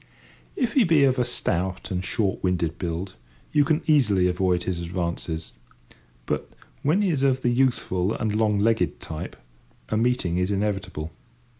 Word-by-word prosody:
If 250 -4 0
he 265 - +5
be 165 -6 +4
of 130 -1 +3
a - - +4
stout 95 -7 -2
and 90 0 -1
short 100 0 -1
winded 85 -3 0
build, 90 +2 -3 0.4
you 150 -1 +4
can 155 +2 +1
easily 105 - +4
avoid 90 0 +1
his 90 -2 -2
advances; 85 -2 -3 0.7
but, - - -2 0.3
when 165 +9 +2
he 190 - +2
is 145 -4 0
of 130 -1 +2
the 120 - +3
youthful 120 -7 +1
and 110 -1 -1
long 105 -1 +2
legged 110 +2 +1
type, 80 -1 -6 0.5
a 110 - 0
meeting 110 -7 +1
is 90 +2 0
inevitable. 95 -6 -2
100 Hz, 160 wpm, -25 LUFS, 90-130 Hz, 0.7 s, he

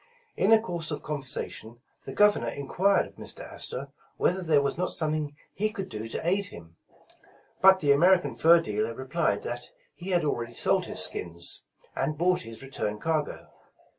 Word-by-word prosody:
In 195 - +2
the 225 0 +7
course 175 -7 -3
of 150 - -5
conversation 130 -5 -3 0.3
the - - -6
Governor 205 - +4
enquired 180 +10 +1
of - - -15
Mr. - - -4
Astor 140 +2 -5 0.3
whether 185 +1 +1
there 160 -4 +3
was 140 - -1
not 180 +2 -2
something 155 -2 -2 0.2
he 215 +2 0
could 195 -3 -6
do 110 +1 -5
to 160 - -3
aid 200 +3 +2
him, 85 - -13 0.9
but 190 0 +7
the 145 -2 +3
American 175 +5 +4
fur 170 +1 +6
dealer 430 - -2
replied - - -1
that - - -5 0.2
he 180 +2 -8
had 175 -4 +2
already 120 -5 -2
sold - - +1
his - - +1
skins, 85 -1 +1 0.3
and 155 - -1
bought 180 +2 +2
his 115 +2 -9
return 105 -6 -3
cargo. 155 0 -2
155 Hz, 170 wpm, -27 LUFS, 135-185 Hz, 0.9 s, the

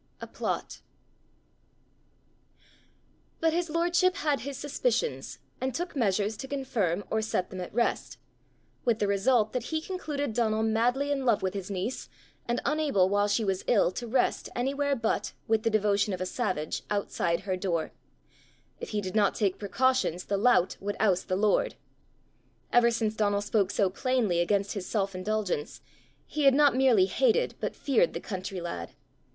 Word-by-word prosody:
But - - -4 2.7
his 345 0 -1
lordship 350 +3 +2
had 300 -8 0
his 280 0 -6
suspicions, 470 - -1 0.2
and 260 -1 -2
took 350 -1 -4
measures 210 -3 +1
to 265 - -6
confirm 235 -10 -1
or 220 - +1
set 215 -4 -2
them 185 -1 -5
at 180 - -6
rest 235 +2 -1 0.7
with 235 -3 +2
the 210 - 0
result 215 +3 +2
that 250 -2 -2
he 315 +3 -1
concluded 300 - -4
Donal 220 -1 +1
madly 245 +6 +1
in 275 -2 0
love 230 -6 +2
with 190 0 -1
his 195 -1 -5
niece, 200 +6 -4 0.4
and 240 +1 0
unable, 285 -11 +2
while 205 +1 +2
she 215 +2 +1
was 190 -1 -1
ill, 205 -6 +4
to 240 +5 -6
rest 250 +2 0
anywhere 280 +3 0
but, 230 -3 -1
with 220 -1 +2
the 225 - +1
devotion 210 -1 +2
of 185 - -4
a 185 - -2
savage, 185 -8 -2
outside 195 -4 -1
her 190 -1 -2
door: 175 -4 -2 0.9
if - - -6
he 210 -1 -1
did 185 -2 -5
not 205 -2 +3
take 200 -4 0
precautions, 230 -3 +1
the 200 - -1
lout 205 -4 +3
would 205 +1 -4
oust 190 -5 +2
the 185 - 0
lord! 205 +2 +2 1.0
Ever 240 -1 +6
since 225 -2 0
Donal 205 -2 +1
spoke 205 -2 +1
so 200 -1 +2
plainly 215 -2 0
against 200 +3 +1
his 200 -3 -5
self 195 -3 -1
indulgence, 185 -4 -2 0.5
he 300 -1 -2
had 270 -1 +6
not 290 -2 +5
merely 255 -7 +5
hated 475 - +2
but - - -3
feared 450 - +2
the - - -3
country 190 -1 -5
lad. 130 - -6
220 Hz, 165 wpm, -28 LUFS, 195-265 Hz, 2.7 s, Ever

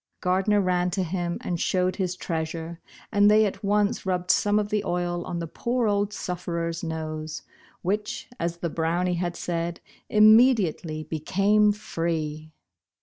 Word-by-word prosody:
Gardner 190 +3 +2
ran 180 -1 +1
to 190 - +1
him 175 0 -2
and 175 -2 -3
showed 185 0 +1
his 185 -2 -1
treasure, 165 -1 -4 0.3
and 205 -1 +5
they 215 +1 +6
at 200 - -4
once 205 +3 +1
rubbed 180 -1 +1
some 205 0 +2
of 210 -1 0
the 210 -1 0
oil 175 -2 -1
on 175 - -4
the 170 - -3
poor 235 +8 -1
old 205 0 +1
sufterer's 170 -3 -3
nose, 155 -1 -4 0.4
which, 210 +3 -2
as 170 0 -2
the 170 0 -3
Brownie 170 +3 0
had 175 0 -2
said, 170 0 -3 0.3
immediately 210 -8 +4
be 155 +1 -4
came 205 +6 +3
free 160 -6 -3
180 Hz, 150 wpm, -26 LUFS, 165-205 Hz, 0.4 s, they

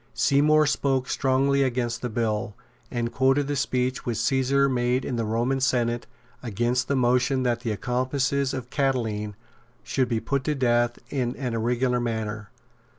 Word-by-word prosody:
Seymour 150 +2 +4
spoke 135 -3 0
strongly 140 +1 +2
against 125 -3 -1
the 125 - -2
bill, 110 -1 -2 0.3
and 120 -1 -2
quoted 135 +2 +2
the 145 - -1
speech 130 -2 -1
which 120 -3 -2
Caesar 135 +2 +2
made 125 0 0
in 125 - -2
the 115 -1 -1
Roman 120 +5 0
Senate 120 -3 0 0.3
against 120 +2 -1
the 140 - 0
motion 125 +1 +2
that 120 -2 +1
the 120 -1 -4
accomplices 130 +4 0
of 125 -1 -6
Catiline 110 -7 -1 0.5
should 130 -3 0
be 115 -2 0
put 140 +3 -1
to 150 - 0
death 120 -2 +1
in 125 -3 -1
an 125 -3 -3
irregular 125 +2 0
manner. 110 -3 -3
125 Hz, 155 wpm, -25 LUFS, 120-135 Hz, 0.5 s, Seymour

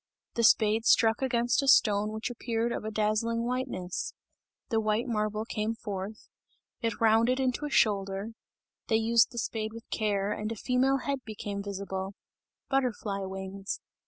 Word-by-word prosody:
The 235 - 0
spade 220 0 +5
struck 225 +1 +4
against 240 -1 +2
a 275 - -2
stone 210 -5 +5
which 220 +3 -3
appeared 235 -1 -1
of - - -3
a 215 - -3
dazzling 220 +2 0
whiteness 240 -8 -3 0.5
the 225 - +2
white 215 +1 +1
marble 215 -2 -1
came 220 0 -2
forth 205 0 -6 0.5
it 230 -3 -1
rounded 230 +3 +4
into 260 +2 0
a - - -3
shoulder; 200 -4 +1 0.6
they 225 - +2
used 225 +1 +4
the 235 - -10
spade 220 -1 -2
with 230 0 -10
care, 205 -2 0
and 215 +1 -3
a - - -3
female 255 +4 +2
head 280 -1 0
became 205 -2 -5
visible 195 -1 -4 0.5
butterfly 240 -7 0
wings. 190 +1 -5
220 Hz, 155 wpm, -29 LUFS, 205-235 Hz, 0.6 s, spade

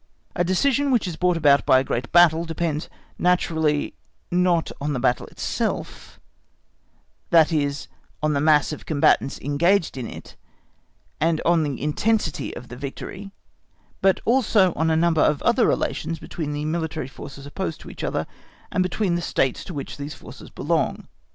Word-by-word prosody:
A 175 - +2
decision 275 +10 +1
which 240 -7 +2
is 175 - -4
brought 180 0 +1
about 145 -3 +4
by 130 - +5
a 130 - +2
great 120 -2 -3
battle 170 -1 +5
depends 165 -2 -3 0.3
naturally 160 -4 +1 0.4
not 175 -2 +2
on 145 +1 -1
the 130 - -2
battle 125 0 +1
itself, - - -4 1.1
that 165 -1 +5
is 145 -3 -1 0.4
on 155 0 +2
the 140 - 0
mass 150 -1 +4
of 150 - -8
combatants 145 -2 +2
engaged 165 +4 +1
in 125 -3 -4
it, - - -10 0.8
and 160 -1 +2
on 170 -1 +4
the 145 -4 -2
intensity 160 +3 0
of 125 - -9
the 125 - -8
victory, 145 +9 -7 0.7
but 195 -1 +3
also 220 -7 +3
on 160 0 0
a 160 - +2
number 165 -1 +3
of 150 - +3
other 235 +1 +3
relations 165 - -1
between 155 -3 -5
the 145 0 -3
military 160 -3 -2
forces 135 +1 -10
opposed 165 +2 -4
to - - -10
each - - -9
other, - - -1 0.5
and 185 - +1
between 185 +1 0
the 175 - 0
States 135 -6 0
to 180 - -7
which 140 - -6
these 145 +1 -6
forces - - -12
belong. - - -1
160 Hz, 165 wpm, -23 LUFS, 145-180 Hz, 1.1 s, by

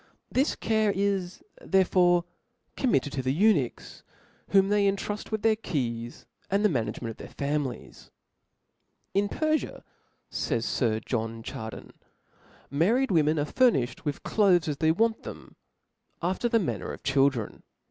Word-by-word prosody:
This 270 +4 +1
care 220 -2 +1
is 195 -2 -1 0.2
therefore 180 -2 +3 0.5
com 260 - 0
mitted 140 - +1
to 135 - -1
the 130 0 0
eunuchs, 160 - +1 0.5
whom 195 0 +4
they 205 -1 +3
intruft 205 +1 -5
with 220 -1 -3
their 225 -1 +4
keys, 120 - -4 0.2
and 200 +2 +2
the - - +5
management 115 - -2
of - - -12
their - - -9
families, 140 -3 -4 0.5
'* - - -48
In 200 +1 +1
Pcrfia, 310 +4 -1 0.5
fays 115 0 -1
Sir 110 -3 0
John 115 -1 -3
Chardin, 110 -1 -7 0.8
married 215 - +2
women 155 -2 +3
• - - +1
are - - 0
furniflied 150 - +2
with 145 -2 -3
cloaths 190 -6 +3
as 150 -2 -2
they 160 +1 +3
want 225 +6 +1
them, - - -10 0.3
*' - - -53 0.3
after 185 +7 0
the 230 - +3
manner 195 -8 -2
of - - -9
children. 135 -5 +1
175 Hz, 150 wpm, -27 LUFS, 135-210 Hz, 0.8 s, the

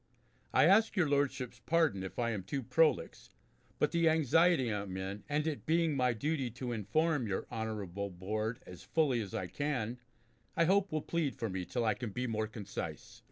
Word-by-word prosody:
I - - +5
ask 215 +6 +5
your 180 -6 +3
Lordships' 135 -4 0
pardon 160 - +2
if 95 -1 -7
I 115 -1 +1
am 105 -3 -2
too 130 +9 -4
prolix, 150 +6 +1 0.5
but - - +2
the 170 -1 +4
anxiety 160 -4 +3
I 105 - -1
am 95 -2 -6
in, 95 +2 -5
and 150 +1 0
it 155 -3 -3
being 165 -1 +2
my 125 -2 +3
duty 135 +2 -1
to 125 +1 -5
inform 125 - +1
your 100 - -2
honourable 105 -4 -3
Board 110 +5 -3
as 90 - -10
fully 140 -7 +1
as 100 -3 -6
I 95 - -2
can, 125 0 -2 0.6
I 170 - +5
hope 195 +3 +3
will 155 -1 -1
plead 165 -5 -1
for 115 -5 -3
me 95 -1 -3
till 120 +2 -1
I 110 - +3
can 120 +1 -5
be 125 +5 -3
more 110 -2 -1
concise. 105 -2 -7
125 Hz, 195 wpm, -33 LUFS, 105-155 Hz, 0.6 s, I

